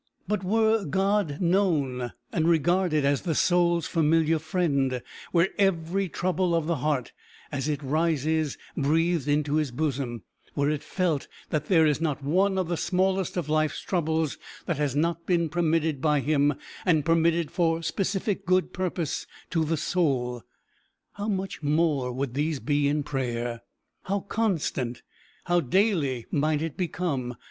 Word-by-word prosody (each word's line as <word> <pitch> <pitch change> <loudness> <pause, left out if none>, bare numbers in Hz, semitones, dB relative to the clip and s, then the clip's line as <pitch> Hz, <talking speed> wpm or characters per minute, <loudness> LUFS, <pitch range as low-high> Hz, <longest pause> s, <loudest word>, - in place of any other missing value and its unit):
But 210 -1 -1
were 220 +2 +2
God 190 -2 0
known 155 - +1 0.2
and 160 -2 +1
regarded 170 -1 +2
as 140 0 +2
the 165 -3 -1
soul's 175 0 +3
familiar 160 0 +2
friend, 140 -6 0 0.3
were 175 +2 +3
every 190 0 +1
trouble 180 0 0
of 165 -2 0
the 170 0 0
heart 140 -2 -1 0.4
as 145 +1 -2
it 145 -1 -2
rises 155 0 0 0.2
breathed 160 +1 +1
into 150 0 +1
his 155 -3 +1
bosom, 125 - -2 0.3
were 145 +1 +2
it 150 -1 -2
felt 175 -7 -1 0.2
that 150 -1 -1
there 165 -4 +5
is 150 0 +1
not 150 -4 -1
one 190 +7 +2
of 185 -3 0
the 175 0 -1
smallest 190 0 0
of 170 -4 -2
life's 155 0 +1
troubles 160 -4 -1 0.3
that 170 - -1
has 145 -2 0
not 170 +2 0
been 170 -3 +2
permitted 160 -3 +1
by 150 -2 +3
him, 145 0 +2 0.3
and 160 -6 +2
permitted 165 -1 +2
for 165 -1 +1
specific 195 +4 -1
good 185 +1 +1
purpose 175 -4 -2 0.2
to 165 -3 +2
the 160 +1 0
soul, 130 -7 0 0.7
how 205 +1 -5
much 195 -4 -3
more 145 -4 +1
would 130 0 -3
these 150 +1 -1
be 145 0 +1
in 145 +1 +1
prayer! 120 -4 -3 0.4
how 195 +1 -1
constant, 165 - -1 0.4
how 175 0 +2
daily 155 - +1
might 155 +1 +1
it 160 -4 -4
become! 155 -9 -2
160 Hz, 150 wpm, -26 LUFS, 145-175 Hz, 0.7 s, there